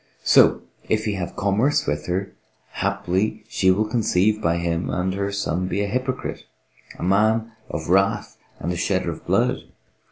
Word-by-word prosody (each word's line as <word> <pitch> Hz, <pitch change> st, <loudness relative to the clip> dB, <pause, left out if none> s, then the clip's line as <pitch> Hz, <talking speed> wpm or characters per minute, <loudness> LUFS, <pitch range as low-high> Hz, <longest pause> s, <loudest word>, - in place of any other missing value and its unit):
So, -, -, +5 dB, 0.3 s
if 110 Hz, 0 st, +1 dB
he 105 Hz, -, 0 dB
have 90 Hz, -3 st, -4 dB
commerce 100 Hz, +8 st, +1 dB
with 75 Hz, -, -2 dB
her, 95 Hz, +2 st, -2 dB, 0.4 s
haply 105 Hz, +4 st, -1 dB
she 95 Hz, -4 st, +1 dB
will 100 Hz, +4 st, +3 dB
conceive 110 Hz, -2 st, +1 dB
by 85 Hz, -2 st, +1 dB
him 85 Hz, 0 st, -1 dB
and 95 Hz, +1 st, -1 dB
her 100 Hz, +1 st, -2 dB
son 90 Hz, -2 st, -1 dB
be 95 Hz, +2 st, -1 dB
a -, -, -1 dB
hypocrite, 130 Hz, +4 st, -3 dB, 0.5 s
a -, -, -6 dB
man 110 Hz, +4 st, +2 dB, 0.2 s
of 80 Hz, +1 st, -4 dB
wrath 95 Hz, +2 st, +2 dB, 0.2 s
and 85 Hz, -, -2 dB
a -, -, -4 dB
shedder 85 Hz, -, 0 dB
of -, -, -9 dB
blood. -, -, +2 dB
100 Hz, 165 wpm, -23 LUFS, 90-110 Hz, 0.5 s, So